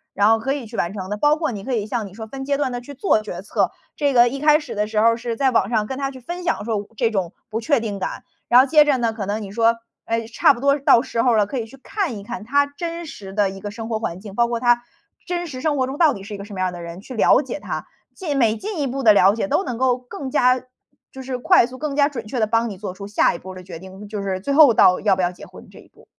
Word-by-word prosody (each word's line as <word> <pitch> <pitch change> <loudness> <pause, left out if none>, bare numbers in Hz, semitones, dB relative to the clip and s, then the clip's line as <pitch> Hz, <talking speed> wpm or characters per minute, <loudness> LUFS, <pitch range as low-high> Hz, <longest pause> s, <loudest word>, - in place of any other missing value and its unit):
然 205 - +4
后 225 0 +4
可 270 +4 -1
以 280 -4 -5
去 225 +2 -10
完 170 -4 -1
成 190 -2 -6
的， 210 - -2
包 295 +6 +3
括 315 -3 -2
你 200 -4 -6
可 255 +2 -2
以 210 -2 -1
像 220 -2 -3
你 190 - -14
说 220 0 -7
分 270 +4 -7
阶 280 0 0
段 275 -3 -1
地 245 0 -4
去 280 +3 -11
做 255 - +2
决 215 - -7
策。 - - 0 0.3
这 285 -1 +1
个 240 0 +7
一 275 +3 -3
开 300 +1 +5
始 290 -7 -7
的 210 0 -1
时 215 -1 -1
候 230 +1 +4
是 235 0 -4
在 270 -2 +2
网 230 -3 +2
上 220 -3 +1
跟 265 +4 -5
他 275 -1 -1
去 260 -1 -10
分 350 +8 -6
享 335 -11 -1
说 210 -3 -2
这 230 -2 +1
种 185 -5 -1 0.2
不 225 +2 -2
确 285 +2 +2
定 210 -3 -4
感， 190 - -4 0.2
然 245 - +7
后 260 - +6
接 300 +2 +6
着 285 -3 +2
呢， 230 -2 0
可 210 -4 -5
能 210 +1 -2
你 195 - -8
说， 230 +2 +3 0.3
哎， 230 0 -1
差 225 - +4
不 - - -9
多 280 +1 +3
到 255 -3 +5
时 230 -3 -1
候 245 -3 +3
了， 210 -2 +3
可 255 +5 -4
以 225 - -5
去 270 - -15
看 345 - -3
一 200 - -9
看 235 0 -6
他 285 +5 +2
真 335 +4 -6
实 195 -9 -9
的 205 -2 +1
一 195 - -9
个 205 - -5
生 225 +1 -7
活 220 -2 -2
环 180 -5 -4
境， 200 -1 -10
包 235 +2 +2
括 235 -1 -2
他 240 0 +3 0.5
真 350 -1 -2
实 260 -5 -7
生 300 -2 0
活 260 - +2
中 270 +4 -6
到 310 -5 +4
底 195 - -9
是 210 +1 -8
一 - - -5
个 200 - -6
什 205 -2 -10
么 - - -6
样 185 -1 0
的 175 - -8
人， 170 +2 -8
去 255 - -10
了 250 +5 +4
解 260 +3 -5
他。 - - -5 0.3
进 310 -7 -3
每 225 -3 +2
进 410 -4 -5
一 275 - 0
步 270 +2 -3
的 220 -5 +7
了 200 0 +5
解， 230 +6 -2
都 295 +7 +1
能 250 -7 -4
够 255 0 +2
更 255 +2 -8
加 255 0 +3 0.5
就 265 - -9
是 255 -1 -4
快 240 - +4
速 255 - -10
更 290 0 -3
加 285 0 +3
准 235 -6 -7
确 245 +3 -4
地 215 - +2
帮 230 +1 +1
你 195 - -7
做 185 -1 -6
出 200 +1 -9
下 205 - +2
一 - - -5
步 190 +1 -9
的 185 - -10
决 175 -3 -9
定， 190 +3 -11
就 210 -2 -4
是 190 -1 -3
最 280 +8 -1
后 285 -5 +7
到 185 -3 +5
要 200 -3 +3
不 185 - -1
要 175 0 +1
结 180 - -12
婚 - - -14
这 - - -14
一 - - -17
步。 - - -22
235 Hz, 340 characters per minute, -21 LUFS, 210-275 Hz, 0.5 s, 个